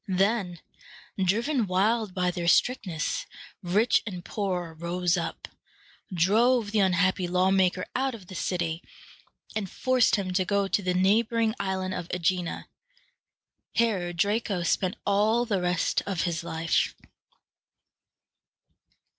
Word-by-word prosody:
Then, 190 -2 0 0.6
driven 230 +5 +1
wild 205 +2 +1
by 180 -1 +1
their 175 -1 -4
strictness, 180 -5 +1 0.3
rich 205 +6 +2
and 180 -4 -6
poor 180 -5 -3
rose 175 +2 -1
up, 170 -2 -4 0.6
drove 210 +6 +3
the 215 - +1
unhappy 185 -1 +2
lawmaker 185 0 +2
out 265 -1 0
of 205 -5 -12
the 185 - -11
city, 175 -2 -2 0.7
and 205 -4 -2
forced 255 +3 +2
him 190 -3 -3
to 185 +1 +2
go 200 +1 0
to 205 - +1
the 180 -1 -1
neighboring 220 +4 +2
Island 190 -1 -2
of 180 -2 -5
Æ - - -2
gi´na. 180 0 -1 1.1
Here 200 -7 +1
Draco 200 +1 0
spent 185 +3 0
all 215 +4 +2
the 200 -5 -1
rest 180 -1 +1
of 190 -4 -1
his 170 -2 -2
life. 165 -1 0
190 Hz, 125 wpm, -27 LUFS, 180-215 Hz, 1.1 s, drove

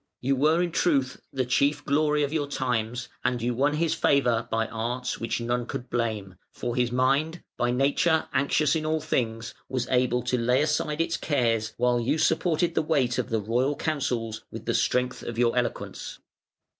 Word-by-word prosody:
You 135 +2 +1
were 155 +6 +3
in 175 - -2
truth 140 -7 +1
the 130 -1 -1
chief 140 +3 +1
glory 150 +1 +2
of 145 +1 -2
your 150 -3 0
times, 120 -3 -2 0.2
and 125 - 0
you 120 +1 -1
won 140 +5 +1
his 165 +1 +1
favour 120 -5 +2
by 115 0 0
arts 120 +3 -3
which 115 - -2
none 120 +1 -1
could 125 - -6
blame, 110 -6 -2
for 120 -1 -4
his 125 -1 +1
mind, 140 +7 +1
by 120 - 0
nature 140 +6 +2
anxious 140 +3 +2
in 160 - -1
all 155 0 0
things, 115 -7 -2 0.2
was 130 -2 -2
able 125 -1 +2
to 125 0 0
lay 125 +4 +3
aside 150 0 0
its 165 0 0
cares 115 -6 0
while 125 0 +2
you 130 +6 0
supported 170 +2 +1
the - - +2
weight 140 -6 +1
of - - -2
the 115 -2 +1
royal 125 +7 0
counsels 120 -9 -2
with - - -8
the - - 0
strength 125 0 0
of 120 - -6
your 120 0 +2
eloquence. 125 -1 -3
125 Hz, 185 wpm, -26 LUFS, 120-150 Hz, 0.2 s, were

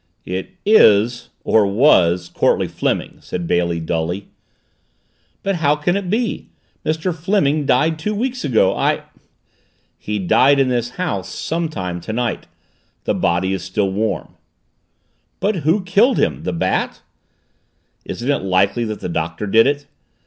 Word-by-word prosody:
"It 95 - -5
is 120 - +4
or 110 -2 +3
was 90 - +3
Courtleigh - - +1
Fleming," - - -2
said 90 - -5
Bailey 85 0 0
dully. 80 +4 -3 1.1
"But 195 -2 0
how 150 -2 +2
can 165 +5 0
it 200 -3 -3
be? 225 +3 -2 0.3
Mr. 160 +3 -1
Fleming 155 -5 +1
died 155 +5 +2
two 210 +6 -2
weeks 250 +3 -2
ago. 110 -8 +2
I - - 0 0.5
" - - -42
"He 105 0 -1
died 130 +9 +4
in 135 -1 +3
this 120 -1 0
house 100 - -2
sometime 100 - -3
tonight. 115 +6 -3 0.6
The - - 0
body 90 +2 0
is 95 -3 -3
still 95 +1 -1
warm." 110 +3 -2 1.0
"But 205 -1 0
who 165 +6 +1
killed 205 +8 +3
him? 75 -5 0
The - - -1
Bat?" - - -1 1.0
"Isn't 125 +4 -3
it 145 - 0
likely 95 +5 +1
that 110 -1 -5
the - - -3
Doctor 85 +3 -3
did 115 +4 +4
it? 145 0 -1
120 Hz, 140 wpm, -19 LUFS, -, 1.1 s, is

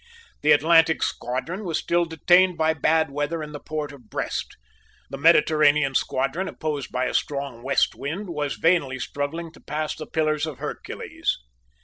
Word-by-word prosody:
The 150 - +4
Atlantic 165 +1 +5
squadron 160 - -3
was 170 -5 -1
still 175 0 +1
detained 175 +2 +3
by 160 0 +2
bad 160 0 +2
weather 145 +3 -2
in 150 - -7
the 145 - -7
port 150 -1 -4
of 125 -6 -15
Brest. - - -4 0.5
The 135 - -5
Mediterranean 150 -3 +4
squadron, 135 +9 0
opposed 150 -6 -4
by 125 0 0
a - - -2
strong 140 -4 -2
west 135 +2 +2
wind, 175 +7 -5
was 150 -3 -2
vainly 165 -6 +2
struggling 150 +5 -4
to - - -17
pass 155 +1 -3
the 155 - -8
pillars 155 -1 0
of 150 -5 -6
Hercules. - - -4
155 Hz, 160 wpm, -24 LUFS, 140-165 Hz, 0.5 s, Atlantic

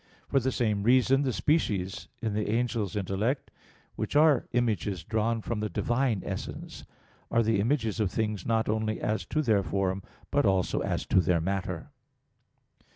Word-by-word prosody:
For 135 - +3
the 130 +1 0
same 110 -5 0
reason, 130 +4 +4
the 135 -2 +1
species 105 - 0 0.2
in 110 -2 0
the 105 0 -1
angel's 115 -2 0
intellect, 105 +7 -1 0.4
which - - -4
are 150 -4 +5
images 105 -7 0
drawn 110 +3 0
from 115 -3 -2
the 105 0 -2
Divine 120 +2 0
essence, - - -6 0.4
are 115 0 +3
the 110 -2 +2
images 115 -1 0
of 105 -3 +2
things 105 -2 -2
not 115 -1 +1
only 110 0 0
as 110 +1 -1
to 155 - 0
their 110 -6 +3
form, 95 +2 -1 0.3
but 145 0 +3
also 95 -2 +2
as - - -2
to 95 - +4
their 85 0 +2
matter. 90 -1 -3
110 Hz, 160 wpm, -28 LUFS, 100-120 Hz, 0.4 s, are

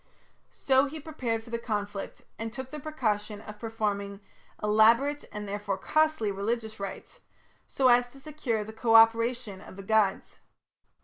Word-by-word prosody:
So 265 0 +2
he 310 +3 -7
prepared 250 -7 -3
for 230 - -14
the 235 - -2
conflict, 205 -3 -4 0.2
and 225 0 -4
took 260 +2 -7
the 305 - -6
precaution 215 -9 -2
of 210 0 -11
performing 205 -3 -3 0.4
elaborate 230 +8 +4
and 210 0 -6
therefore 200 -1 -3
costly 310 -9 +1
religious 220 +2 -3
rites 200 - -7 0.5
so 265 - +2
as 245 0 +5
to 275 - -16
secure 270 -7 -3
the 220 +1 -9
co 225 0 +2
operation 225 -2 +4
of - - -12
the 195 - -9
gods. 210 -1 +1
225 Hz, 150 wpm, -28 LUFS, 210-255 Hz, 0.5 s, as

